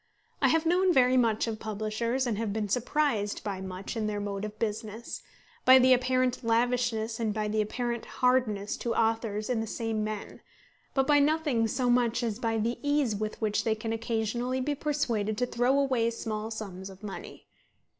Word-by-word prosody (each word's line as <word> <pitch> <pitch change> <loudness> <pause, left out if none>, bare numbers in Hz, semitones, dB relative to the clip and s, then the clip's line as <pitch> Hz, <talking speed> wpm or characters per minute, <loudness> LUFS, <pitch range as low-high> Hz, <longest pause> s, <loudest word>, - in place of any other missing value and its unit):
I - - +5
have 325 0 +2
known 360 +2 +3
very 255 -4 +4
much 230 -4 +3
of 225 -2 -4
publishers 220 +4 -2
and 235 -3 0
have 225 -2 -1
been 210 0 -2
surprised 240 -1 0
by 195 -3 -4
much 190 +2 -6
in 220 -2 -1
their 210 -1 -2
mode 200 -1 -4
of 215 0 -8
business, 220 +1 -4 0.4
by 260 0 +9
the 260 0 +6
apparent 255 0 +1
lavishness 230 -1 +1
and 225 -2 0
by 215 0 -2
the 215 +1 +1
apparent 235 +2 -3
hardness 250 -6 +1
to 235 - -2
authors 225 -2 0
in 245 -3 0
the 225 - -4
same 225 -1 -2
men; 215 -1 -5 0.5
but 270 -1 +3
by 290 +1 +5
nothing 290 -6 +2
so 250 +3 -1
much 245 -1 +2
as 225 -2 -2
by 225 -2 0
the 230 +2 -1
ease 285 -6 +1
with 215 +1 -4
which 215 -1 +1
they 220 -1 +1
can 225 +1 -3
occasionally 230 +3 -1
be 285 +3 0
persuaded 240 -8 -1
to 250 - +1
throw 245 +3 +1
away 260 -5 +2
small 220 -2 -4
sums 195 -4 -6
of 190 +1 -14
money. 200 -2 -8
230 Hz, 185 wpm, -29 LUFS, 215-250 Hz, 0.5 s, by